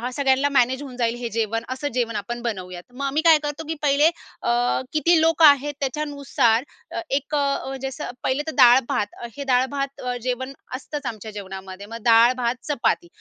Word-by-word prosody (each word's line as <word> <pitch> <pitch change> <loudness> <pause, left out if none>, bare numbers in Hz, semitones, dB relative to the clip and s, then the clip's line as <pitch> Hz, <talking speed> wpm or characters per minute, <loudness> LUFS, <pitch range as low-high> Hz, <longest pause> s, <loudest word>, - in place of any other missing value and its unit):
सगळ्यांना 270 0 +2
मॅनेज 260 +3 +1
होऊन 265 -3 -9
जाईल, 235 -1 0
हे 240 -1 -5
जेवण, 225 0 -1
असं 260 +3 -3
जेवण 230 -3 -1
आपण 235 +4 -4
बनवूयात. 185 -6 -5
मग 280 +3 -6
आम्ही 280 +3 0
काय 320 -2 +8
करतो, 295 +2 -4
की 320 - -2
पहिले 295 +2 +4 0.3
अ 240 +2 +1
किती 330 +2 +4
लोकं 325 0 +5
आहेत, 290 0 +5
त्याच्यानुसार 275 -4 0 0.3
अ, - - -3
1 285 +2 -1
अ 285 -1 +2 0.2
म्हणजे 270 0 -4
असं, 270 +1 -6
पहिले 265 +2 0
तर - - -1
डाळ-भात. 245 -4 +5 0.3
हे 280 - -4
डाळ-भात 270 +1 0 0.2
जेवण 255 +2 -3 0.2
असतंच 290 +2 -6
आमच्या 220 -2 -5
जेवणामध्ये. 190 -1 -8
मग 230 - -7
डाळ-भात, 235 +1 +4
चपाती. 265 - 0
260 Hz, 175 wpm, -23 LUFS, 235-285 Hz, 0.3 s, काय